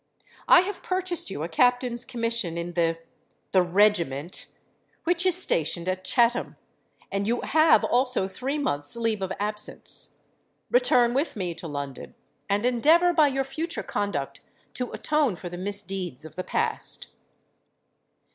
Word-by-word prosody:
I - - +8
have 385 +1 -5
purchased 370 - -3
you 155 -6 -5
a - - -2
Captain's 245 +6 +1
commission 230 -8 -1
in 170 +1 -4
the—the 165 +2 -2
regiment, 175 -5 +1 0.6
which 350 +2 +2
is 365 -1 +6
stationed 170 - +3
at 185 0 -2
Chatham; 240 +3 +1 0.6
and 200 +1 -2
you 240 +2 0
have 315 +1 +4
also 250 -5 +1
three 265 +9 -4
months' 145 - -1
leave 225 -3 -1
of 190 -1 -3
absence. 210 +1 -3 0.6
Return 245 -1 +3
with 280 +5 -1
me 180 -4 -3
to 165 - -8
London; 145 -3 -7 0.3
and 205 +3 +1
endeavour 315 +9 +4
by 310 -3 +5
your 270 -1 -1
future 315 +6 -4
conduct 145 -10 -3 0.3
to 250 -1 -4
atone 300 -9 0
for 175 +1 -8
the 175 - -8
misdeeds 195 -7 -1
of 160 - -12
the 185 - -4
past.' - - 0
215 Hz, 140 wpm, -25 LUFS, 175-265 Hz, 0.6 s, I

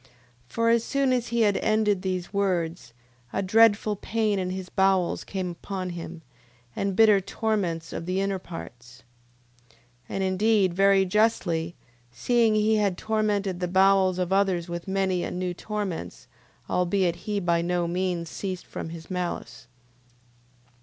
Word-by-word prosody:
For 230 - 0
as 230 0 +3
soon 275 -1 +1
as 245 -2 0
he 235 0 0
had 205 -2 +3
ended 215 -3 +1
these 185 -1 -3
words, 175 -7 -1 0.4
a 195 - -1
dreadful 215 +1 +4
pain 215 0 -1
in 185 -1 -2
his 185 0 -5
bowels 190 -1 +1
came 185 -2 -4
upon 185 +1 -5
him, 170 -1 -8 0.5
and 195 -1 -1
bitter 210 -2 +6
torments 185 -6 -2
of 170 - -5
the 185 +1 0
inner 195 -1 -1
parts. 125 -9 -10 0.7
9:6. 115 - -26 0.3
And 195 - -2
indeed 190 0 +2
very 195 +1 +4
justly, 180 -5 +1 0.4
seeing 225 - +2
he 215 +1 +3
had 200 -4 +1
tormented 210 -4 -1
the 180 - -1
bowels 190 0 +4
of 180 0 -1
others 190 -3 +1
with 170 +1 -6
many 190 -2 0
and - - -4
new 180 -1 -2
torments, 175 - -5 0.4
albeit 180 -1 +1
he 205 -1 0
by 170 -2 +1
no 175 0 0
means 175 -1 -2
ceased 185 +1 -5
from - - -6
his 165 +1 -10
malice. 180 -8 -4
190 Hz, 150 wpm, -26 LUFS, 175-210 Hz, 0.7 s, bitter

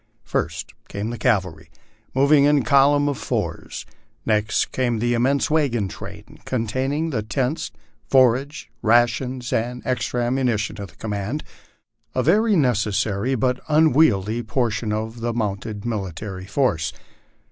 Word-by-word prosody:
First - - -3
came 105 +3 -4
the 120 - -5
cavalry, 95 -9 0 0.5
moving 140 +1 +5
in 145 -2 +4
column 140 +4 +4
of 140 -2 -1
fours; - - -3 0.4
next 105 -1 +1
came 120 -3 0
the 120 +2 +1
immense 135 +5 +1
wagon 130 -10 +1
train, - - -10
containing 130 +7 -1
the 115 -6 -1
tents, 130 +7 -2 0.4
forage, 130 -1 +2
rations, 120 +2 +2
and 120 +2 -1
ex 115 -4 0
tra 120 -1 -1
ammunition 120 -4 0
of 100 - -7
the 75 - -20
command, 105 +7 -3 0.7
a 130 - +1
very 210 - +4
necessary 110 - +1
but 125 +1 0
unwieldy 130 -9 +3
portion 115 -1 -1
of 110 +2 -4
a 120 0 0
mounted 105 -1 -3
military 95 -3 -4
force. 95 - 0
120 Hz, 130 wpm, -22 LUFS, 105-135 Hz, 0.7 s, moving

